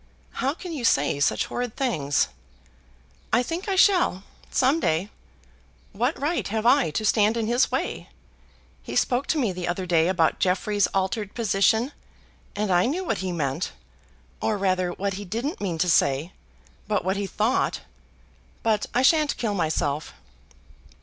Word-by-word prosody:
"How 275 +3 -1
can 355 -1 -7
you 280 -6 -5
say 145 -9 +2
such 145 - +2
horrid 245 -2 -4
things?" 150 - 0 1.0
"I 240 - +3
think 340 - -4
I 390 - +1
shall, 360 - +3 0.3
some 265 +5 +2
day. 175 - 0 0.8
What 245 +9 -1
right 310 +5 -1
have 220 +2 -2
I 260 - +4
to 215 +8 -2
stand 215 +2 +3
in 225 - 0
his 240 +4 +2
way? - - -3 0.7
He - - -7
spoke 250 +2 +1
to 315 - +1
me 240 -9 +1
the 180 -1 -5
other 180 +1 -2
day 170 -2 +3
about 175 -4 +1
Jeffrey's 195 +2 +1
altered 195 +2 -2
position, 220 +3 +2 0.6
and 205 -1 -1
I 180 +3 +4
knew 340 +8 -1
what 350 - -1
he 185 -1 -2
meant; 140 -6 -2 0.7
or 215 - 0
rather 185 -2 +1
what 195 +3 -3
he - - -5
didn't 230 - -4
mean 180 -5 -2
to 180 - +1
say, 150 0 +2 0.6
but 210 -3 0
what 190 +1 +1
he 200 0 -2
thought. 220 +6 0 0.8
But 220 -2 +1
I 250 - +3
shan't 305 +1 +3
kill 220 -4 -1
myself." 155 -4 -1
210 Hz, 160 wpm, -25 LUFS, 180-250 Hz, 1.0 s, I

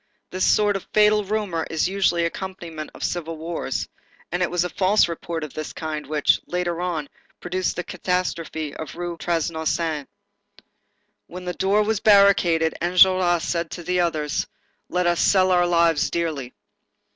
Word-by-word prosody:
This 185 0 -2
sort 205 -1 +3
of 195 - -5
fatal 210 0 +4
rumor 200 -5 -2
is 160 - 0
the 185 - -1
usual 195 -3 +2
accompaniment 170 -3 -6
of - - -8
civil 165 -2 -3
wars, 165 +2 -3 0.4
and 175 +1 -1
it 180 - +1
was 180 -1 +1
a 180 - -2
false 195 +2 +3
report 170 -1 -5
of 155 - -7
this 155 - -6
kind 155 -3 -5
which, 150 -1 +2
later 175 -1 -2
on, 165 -5 -2 0.3
produced 180 +1 -2
the 180 - -3
catastrophe 170 -4 -3
of 155 -3 -7
the - - -14
Rue 175 -1 -4
Transnonain. 160 -2 -1 1.2
When 180 +1 -9
the 180 - -2
door 200 +4 +2
was 215 -1 0
barricaded, 195 -6 +4
Enjolras 180 -1 +4
said 170 -1 -2
to 175 - -7
the 180 +2 0
others: 155 -4 0 0.4
"Let 180 0 0
us 175 0 +2
sell 185 -1 +4
our 175 -1 +4
lives 170 -4 +3
dearly." 150 -6 -3
175 Hz, 165 wpm, -23 LUFS, 160-185 Hz, 1.2 s, fatal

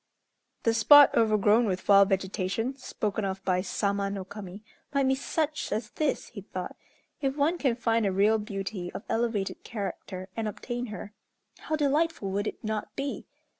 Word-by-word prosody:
"The 230 - +3
spot 290 +6 +8
overgrown 215 +1 +4
with 190 -3 -2
wild 200 -1 +7
vegetation, 195 +5 -1
spoken 215 -5 -3
of 195 0 -3
by 185 -1 +2
Sama 200 +1 -1
no 195 -1 -4
Kami 200 0 -9 0.3
might 280 -2 +2
be 265 - +4
such 300 +2 -2
as 215 0 -2
this," 305 -3 -1
he 210 - -8
thought. 185 -1 -6 0.5
"If 270 0 -1
one 320 +5 +2
can 260 -5 +2
find 230 -1 +1
a - - +1
real 210 +4 +3
beauty 195 -3 -5
of 190 - -6
elevated 225 -4 -1
character 195 -3 -5
and 225 -1 -2
obtain 240 +4 -4
her, 210 -1 -8 0.5
how 310 - -2
delightful 295 -7 +1
would 205 +2 -1
it - - -6
not 215 -1 -3
be! 275 0 -4
215 Hz, 170 wpm, -28 LUFS, 195-250 Hz, 0.5 s, spot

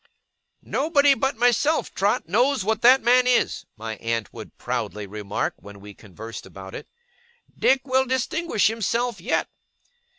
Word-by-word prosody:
'Nobody 285 -1 +3
but 270 -3 -1
myself, 245 +6 +1
Trot, 200 -4 0
knows 245 - +2
what 220 +1 0
that 255 +3 +6
man 250 +1 +4
is!' 250 -1 +1
my 110 0 -6
aunt 115 -1 -3
would - - -11
proudly 105 -3 -4
remark, 105 0 -3
when 100 0 -13
we 100 +1 -12
conversed 110 +4 -10
about 95 0 -11
it. - - -8 0.7
'Dick 265 0 +3
will 260 0 +1
distinguish 260 - 0
himself 230 0 0
yet! 230 - 0
225 Hz, 140 wpm, -23 LUFS, -, 0.7 s, that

